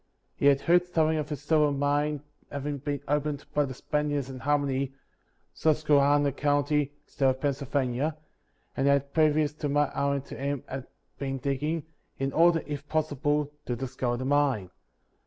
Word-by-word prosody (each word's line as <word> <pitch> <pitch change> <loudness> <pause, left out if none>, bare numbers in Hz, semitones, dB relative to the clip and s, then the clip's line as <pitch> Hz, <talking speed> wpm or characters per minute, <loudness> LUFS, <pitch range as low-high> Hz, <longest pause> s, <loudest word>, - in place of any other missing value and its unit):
He 140 - +2
had 140 -1 +5
heard 175 +3 +4
something 160 -2 +2
of 150 0 -4
a - - 0
silver 150 0 +2
mine 145 +1 0 0.3
having 145 0 -3
been 145 0 -3
opened 150 0 -1
by 145 -1 +3
the 130 -2 -6
Spaniards 145 -2 -1
in 130 - -8
Harmony, 140 -1 0 0.6
Susquehanna 145 -2 +3
county, 145 +1 +1
state 135 -3 +1
of 130 0 -1
Pennsylvania; 140 +1 -1 0.6
and 135 0 +1
had, 140 0 +2
previous 155 -1 +3
to 150 -1 -3
my 145 +1 +3
hiring 140 -1 0
to - - -9
him, 140 -1 -2 0.6
been 135 -1 -2
digging, 145 +4 -1 0.3
in 135 0 -2
order, 165 0 +4
if 145 -1 -6
possible, 150 -1 0 0.2
to 120 - -1
discover 125 -1 -2
the 130 - -4
mine. 135 -9 +1
145 Hz, 155 wpm, -28 LUFS, 135-150 Hz, 0.6 s, had